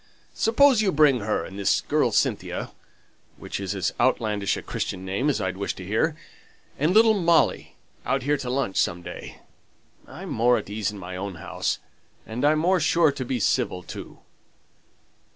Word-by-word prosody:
Suppose 245 +1 +4
you 200 -3 +2
bring 145 -5 +4
her, 105 0 -1
and 95 +1 -9
this 100 - +2
girl - - +1
Cynthia - - -1 0.7
(which - - -6
is 100 0 -3
as 95 -1 -1
outlandish 110 -5 +1
a - - -7
Christian 95 0 -4
name 100 +10 0
as 145 - 0
I'd 95 0 -2
wish 100 - -3
to 95 - -9
hear), 110 - 0 0.6
and 155 +5 +2
little 220 +2 +6
Molly 170 -5 +2 0.3
out 135 -2 -1
here 145 +2 +1
to 125 - -5
lunch 130 -6 -1
some 85 0 0
day, 90 +1 -9 0.7
I'm - - -9
more 120 +2 +3
at - - -6
my - - -6
ease 105 -1 -1
in 105 - -9
my 90 -1 -7
own 95 0 -5
house, 85 - -3 0.5
and 115 +4 -5
I'm 150 +1 +4
more 180 +4 +2
sure 170 -4 +3
to 140 - -5
be 125 0 -2
civil, 90 -3 0
too. - - -9
120 Hz, 180 wpm, -25 LUFS, 100-155 Hz, 0.7 s, little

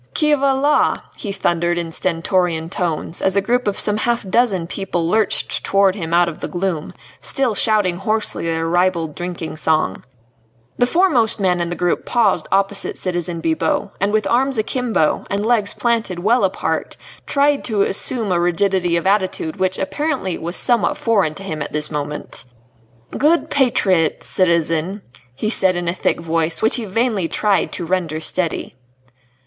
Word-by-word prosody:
"Qui 300 -1 +3
va 275 -1 +2
la?" 290 +3 +3 0.2
he 205 - -5
thundered 175 -2 0
in 170 -1 -3
stentorian 170 -1 -1
tones 165 -1 -3
as 190 0 +1
a - - +5
group 245 +5 0
of 200 - -1
some 210 0 +2
half 235 -2 -1
dozen 195 -4 +2
people 175 -2 -3
lurched 215 +3 0
towards 195 -1 +3
him 165 -5 -5
out 175 0 +4
of 165 - -6
the - - -3
gloom, 175 -4 -3 0.3
still 265 -5 0
shouting 205 -4 +2
hoarsely 215 -2 -1
their 165 0 -1
ribald 170 -2 +1
drinking 175 -2 -5
song. 155 -11 0 0.8
The 245 - +4
foremost 275 - +3
man 180 -3 +1
in 170 - -2
the 175 - -3
group 175 -1 0
paused 205 -9 +1
opposite 195 +1 0
citizen 175 -2 -3
Bibot, 160 0 0
and 200 +1 +1
with 215 -1 +1
arms 260 +5 +1
akimbo, 220 - 0
and 200 +1 -1
legs 220 -4 +1
planted 230 -6 0
well 220 +7 +2
apart 190 - -2 0.3
tried 285 0 +2
to 210 -4 +1
assume 215 +1 0
a 175 - +2
rigidity 175 0 +1
of 170 - -3
attitude 190 -4 0
which 185 0 0
apparently 265 - -2
was 170 +3 -4
somewhat 240 -3 +2
foreign 200 -9 +1
to 195 - -9
him 155 -6 -5
at - - -5
this 150 0 0
moment. 150 -2 -4 0.7
"Good 320 +4 +2
patriots, 195 - +2
citizen," 170 +2 0 0.3
he 215 +11 -2
said 190 -5 +3
in 175 -1 -3
a 170 - +1
thick 180 - -1
voice 165 +1 -1
which 220 - +3
he 235 - -4
vainly 215 -3 0
tried 205 +3 +1
to 175 - -3
render 170 -3 -1
steady. 165 -2 -3
190 Hz, 165 wpm, -19 LUFS, 170-220 Hz, 0.8 s, a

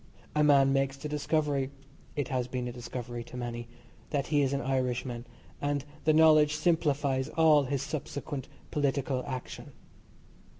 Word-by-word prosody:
A 150 - +3
man 140 -2 +5
makes 135 0 +1
the 150 - -5
discovery 150 -2 0 0.5
(it 145 -3 -2
has 125 -2 -1
been 125 -1 -3
a - - -3
discovery 120 0 -6
to 125 - -9
many) 120 -1 -4 0.4
that 140 -2 0
he 145 -2 +2
is 135 -1 +2
an 140 0 0
Irishman, 125 -2 -1 0.3
and 145 -1 -1 0.2
the 155 - +5
knowledge 155 -1 +6
simplifies 145 -5 +1
all 155 -3 +5
his 140 0 -1
subsequent 145 -2 -5 0.2
political 140 -3 0
action. 130 -2 -6
140 Hz, 145 wpm, -30 LUFS, 125-150 Hz, 0.5 s, knowledge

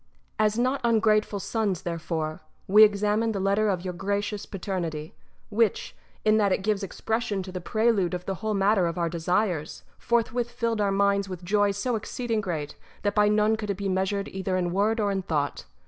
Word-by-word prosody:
§ - - -42 0.4
2. 215 - +4
As 210 +1 +1
not 255 +3 +1
ungrateful 215 -3 +2
sons, 200 -2 -1
therefore, 160 -2 -3 0.3
we 210 +3 +8
examined 210 +1 +2
the - - -1
letter 200 +2 +2
of 185 -2 -1
your 180 - -3
gracious 200 +2 -2
Paternity, 170 -5 -4 0.4
which, 220 -1 0 0.3
in 215 0 +5
that 205 -2 +3
it 190 - 0
gives 210 -1 +1
expression 205 0 -2
to 185 - -8
the 180 0 -5
prelude 215 -3 +1
of 180 0 -6
the 195 - -2
whole 215 -1 -1
matter 195 -2 +3
of 165 - -4
our 170 -1 0
desires, 170 -1 -1 0.2
forthwith 235 0 0
filled 230 -2 -1
our 200 - +2
minds 200 0 +2
with 185 -1 -7
joy 205 +3 +2
so 205 +5 -1
exceeding 225 +1 -2
great 160 -7 -4 0.3
that 205 - +1
by 210 0 +4
none 210 +1 +3
could 215 -1 -5
it 200 - -1
be 200 -1 -3
measured 190 +2 0
either 190 -1 -2
in 175 -1 -1
word 215 +4 +1
or 205 -2 +1
in 195 -1 -1
thought. 150 -5 -2
200 Hz, 200 wpm, -26 LUFS, 185-215 Hz, 0.4 s, we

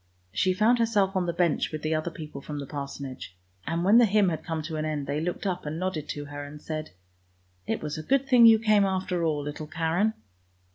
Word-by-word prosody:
She 185 - +2
found 230 +5 +3
herself 205 -4 +2
on 180 -2 +1
the - - +1
bench 170 -2 +1
with 155 -1 -5
the 155 +1 0
other 155 +2 -1
people 155 -4 -8
from 150 +1 -6
the 140 - -4
Parsonage. 135 -10 -7 0.3
And 165 +1 -1
when 205 +6 +6
the 240 - +6
hymn 205 -2 +3
had 160 -2 -4
come 160 -2 -3
to 155 0 -4
an 155 - -2
end 155 -2 -2
they 145 +2 -2
looked 175 +4 -3
up 185 -2 -1
and 150 +1 -4
nodded 170 -4 -3
to 145 0 -4
her 145 0 -7
and 145 +1 -9
said, 155 0 -5 0.4
" 90 0 -39
it - - -2
was 150 0 -4
a - - -4
good 270 +9 +1
thing 245 -3 +7
you 225 -1 +8
came 215 -2 +3
after 185 -2 -1
all, 150 -3 0
little 150 +1 -6
Karen! 170 +7 0
160 Hz, 240 wpm, -27 LUFS, 150-190 Hz, 0.4 s, you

